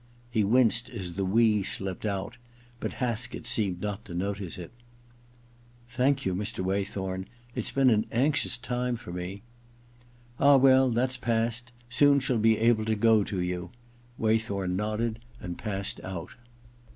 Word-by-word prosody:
He 110 -3 +2
winced 120 +2 +4
as 95 -7 -4
the 100 +3 -2
we 105 +2 +3
slipped 95 +1 -3
out, 100 +4 -4 0.4
but - - -4
Haskett 120 -1 -3
seemed 105 -7 0
not 105 +1 -4
to 85 - -8
notice 100 0 -3
it. 85 -2 -8 0.6
* 120 0 -29
Thank 135 +2 +2
you, 95 - 0
Mr. 95 -1 -2
Waythorn. 95 -1 -2 0.3
It's 120 -3 -1
been 135 -2 +3
an 110 0 +2
anxious 135 +1 +2
time 125 0 -2
for 115 -7 -9
me.' 90 +3 -6 0.5
* 120 0 -29
Ah, 140 0 +7
well, 130 0 +5
that's 125 +2 0
past. 120 0 -1 0.2
Soon 140 +3 +4
she'll 130 -3 0
be 110 0 +4
able 115 -1 +3
to 110 0 +1
go 110 0 +4
to 95 - -3
you.' 90 0 -3 0.5
Waythorn 110 -4 0
nodded 110 +3 -2 0.2
and 90 -4 -6
passed 100 -3 -2
out. 95 -3 -6
110 Hz, 155 wpm, -28 LUFS, 100-120 Hz, 0.6 s, Ah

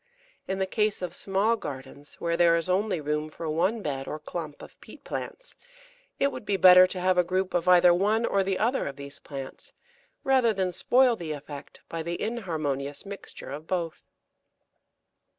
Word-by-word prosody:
In 190 - -2
the 190 - 0
case 210 0 0
of 180 - -4
small 200 +4 +1
gardens, 140 -5 -8
where 170 0 -1
there 170 -1 +5
is 165 0 -1
only 185 0 +1
room 150 +1 -2
for 165 +1 -7
one 185 +8 0
bed 135 -2 -3
or 150 - -4
clump 155 -1 -7
of - - -15
peat - - -14
plants, - - -6 0.7
it 280 - +2
would - - -7
be 205 -1 0
better 185 0 +8
to 185 - -5
have 185 0 +2
a - - +5
group 185 +2 -1
of 175 0 0
either 180 -1 +7
one 210 +6 +2
or 200 - +2
the 190 -1 0
other 240 +5 0
of 140 - -5
these 140 0 -7
plants, 135 -2 -8 0.5
rather 260 -4 +3
than 190 -2 -1
spoil 250 +6 +3
the 165 -7 -5
effect 145 -1 -10
by 165 - -4
the 170 +1 -4
inharmonious 155 - -3
mixture 200 -8 -9
of 150 +3 -7
both. 170 -3 -2
180 Hz, 185 wpm, -27 LUFS, 155-200 Hz, 0.7 s, better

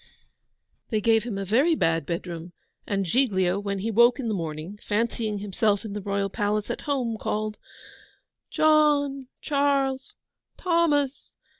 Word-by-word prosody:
They 220 - +1
gave 225 +1 +3
him 225 -5 -4
a 195 - -3
very 270 - +3
bad 165 - 0
bedroom, 170 0 -5 0.3
and 195 -1 0
Giglio, 190 -4 +1
when 200 -1 -3
he 215 +4 -2
woke 235 +4 +5
in 240 -4 -2
the - - 0
morning, 165 +2 -5
fancying 220 0 -1
himself 205 +1 0
in 210 - -5
the 210 - -4
Royal 200 0 -1
Palace 205 +1 -1
at - - -5
home, 240 -6 -1
called, 215 0 -3 0.9
'John, 295 -3 +3
Charles, 275 -2 0 0.4
Thomas! 310 -6 +1
215 Hz, 140 wpm, -25 LUFS, 195-270 Hz, 0.9 s, woke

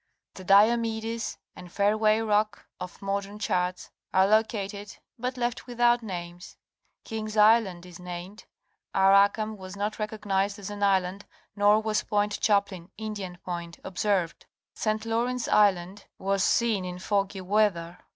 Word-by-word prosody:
The 190 - -10
Diomedes 225 +3 +2 0.2
and 180 -1 -11
Fairway 215 +2 +2
Rock 210 -1 0
of 180 +2 -8
modern 200 +1 -3
charts 180 -3 -2 0.2
are 190 0 +4
lo 215 +2 +5
cated 205 -2 -6 0.2
but 250 +2 -3
left 240 0 -2
without 240 0 +2
names, 175 -3 -8 0.5
King's 215 -1 -5
Island 210 -5 +4
is 180 -1 -12
named; 180 +3 -8 0.5
Arakam 200 +3 +4
was 185 0 -9
not 210 +2 -3
recognized 205 -2 -1
as 205 0 -7
an 205 0 -7
island 195 0 +1 0.3
nor 205 +1 +4
was 215 -1 0
Point 205 0 -1
Chaplin 200 -4 0
(Indian 205 -4 -6
Point) 170 -1 -5
observed. 190 -2 -1 0.3
St. 215 0 -2
Lawrence 240 +2 -1
Isiand 195 -1 +2
was 195 0 0
seen 225 -5 +2
in 180 0 -5
foggy 195 0 -1
weather. 185 -3 0
205 Hz, 135 wpm, -27 LUFS, 185-215 Hz, 0.5 s, lo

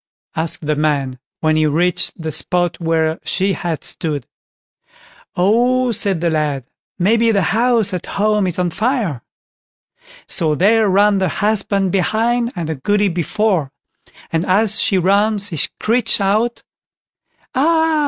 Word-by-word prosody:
asked 160 -1 -2
the 150 0 0
man, 140 -4 -1 0.2
when 155 -1 +2
he 155 0 +2
reached 175 +5 0
the 160 -1 -4
spot 175 +3 0
where 160 -1 0
she 195 +1 0
had 170 -3 -4
stood. 150 -5 -2 1.1
"Oh", 240 +7 +2
said 195 -5 +1
the 170 -1 +1
lad, 150 -4 -1 0.3
"maybe 225 +5 +2
the 200 -4 +2
house 230 -3 +2
at 180 - -4
home 210 -1 0
is 175 - -3
on 180 -1 0
fire!" 215 - -1 1.0
So 160 -4 +1
there 210 +5 +3
ran 200 +1 +3
the 190 -2 0
husband 200 -2 0
behind 230 +5 0
and 170 -3 -4
the 160 - -2
Goody 205 +8 0
before; 175 -2 -1 0.6
and 165 0 0
as 210 +3 +2
she 195 - +2
ran 200 +4 +2
she 200 -3 -5
screeched 230 - 0
out: 215 +5 0 0.9
"Ah! 320 +3 +2
190 Hz, 140 wpm, -17 LUFS, 160-220 Hz, 1.1 s, there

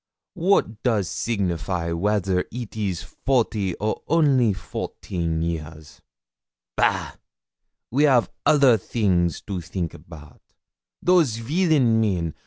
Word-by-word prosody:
What 175 - +1
does 110 -7 +1
signify 90 -5 -2
whether 95 +1 0
it 120 -2 -7
is 100 -6 -2
forty 110 -8 -1
or 110 +1 -2
only 140 -8 +3
fourteen 85 -3 -4
years? 80 -2 -6 0.7
Bah! - - 0 0.7
we 145 +5 +4
av 125 -4 +4 0.2
other 140 -7 +5
theeng 90 -5 +1 0.2
to 100 -3 -3
theenk 85 0 -4
about. 75 -4 -13 0.6
Those 170 -10 +4
villain 135 -3 +2
men! 90 -7 0
105 Hz, 105 wpm, -23 LUFS, 85-125 Hz, 0.7 s, other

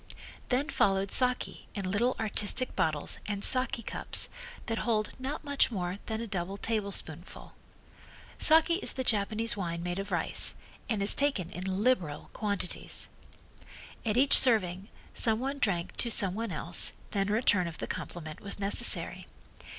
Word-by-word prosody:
Then 270 +4 0
followed 195 -5 +1
saki 250 -1 +1
in 195 -3 -3
little 240 +6 +1
artistic 220 +3 0
bottles 155 -2 0
and 205 -1 -3
saki 255 -2 +4
cups - - 0 0.4
that 225 -1 -2
hold 215 -3 0
not 275 +5 -4
much 285 -2 +2
more 185 -3 -4
than 220 -1 -3
a 230 - -4
double 195 -2 -4
tablespoonful. 200 -6 -3 0.9
Saki 325 +2 +5
is 400 - -2
the 260 - -3
Japanese 220 0 +1
wine 170 -4 -4
made 180 +1 -3
of 195 - -6
rice, - - +1 0.3
and 215 -4 0
is 200 - +4
taken 280 - -1
in 190 +3 -3
liberal 185 -13 0
quantities. 200 -4 -3 0.9
At 220 0 0
each 275 +2 +8
serving 200 -5 +1 0.2
some 220 -1 +2
one 275 +3 -3
drank 180 -9 -1
to 235 - -1
some 195 -5 +3
one 225 0 -4
else, 165 +1 0 0.2
then 195 -1 -1
a - - +1
return 205 -5 +3
of 165 - -7
the - - -4
compliment 155 -3 -6
was 200 - -1
necessary. 200 0 +2
205 Hz, 155 wpm, -30 LUFS, 185-240 Hz, 0.9 s, each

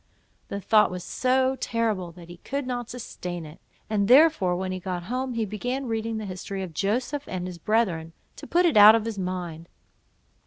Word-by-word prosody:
The 200 - -4
thought 210 +2 +4
was 180 -1 -6
so 260 +3 +1
terrible, 220 -9 -1
that 170 -1 -13
he 175 0 -11
could 280 +9 -4
not 245 -2 -4
sustain 180 -8 -6
it; 150 +2 -12 0.3
and 205 -2 0
therefore 260 - +5
when 185 +1 -3
he 185 - -3
got 180 -1 -4
home, 255 +5 -3
he 225 -1 0
began 245 +6 -3
reading 225 -1 -2
the 215 - -4
history 190 +1 -5
of 175 -3 -7
Joseph 245 - -1
and 180 -1 -4
his 180 -2 -7
brethren, 170 -6 0 0.2
to - - -9
put 355 +1 +3
it 325 -9 +3
out 210 +1 +10
of 225 -1 0
his 225 -3 -4
mind. 175 -3 -5
210 Hz, 195 wpm, -26 LUFS, 180-245 Hz, 0.3 s, out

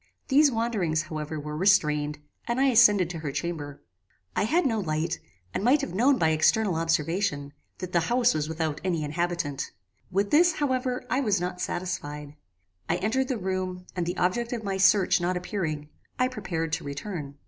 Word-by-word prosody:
These 290 +1 +5
wanderings, 210 -10 0
however, 155 0 -5
were 150 +1 -6
restrained, 150 -5 +2 0.3
and 235 +2 0
I 270 0 +4
ascended 210 -7 +6
to 165 - -5
her 150 -3 -4
chamber. 145 -2 -5 0.5
"I - - +2
had 330 +9 +2
no 225 -5 +1
light, 160 -2 -1 0.3
and - - -2
might 270 +5 +4
have 185 - -4
known 255 +8 +4
by 160 - +3
external 180 +6 +3
observation, 165 -2 0 0.2
that 185 -1 -6
the 170 - +4
house 245 0 +3
was 155 0 -2
without 160 -2 -2
any 170 -4 0
inhabitant. 160 -2 -2 0.4
With 200 +2 0
this, 340 +3 +5
however, 255 -4 -1
I 255 - +2
was 210 -8 +1
not 180 0 -4
satisfied. 150 -5 -4 0.6
I - - +3
entered 255 +6 0
the 255 - -1
room, 185 -2 -3
and 175 -2 -2
the 175 +1 -3
object 235 +7 0
of 230 -2 -4
my 195 -1 -2
search 190 -1 +4
not 180 +1 0
appearing, 160 -6 -3 0.3
I 255 0 +2
prepared 165 -9 -3
to 165 - -1
return. 140 0 -6
180 Hz, 180 wpm, -27 LUFS, 155-225 Hz, 0.6 s, ascended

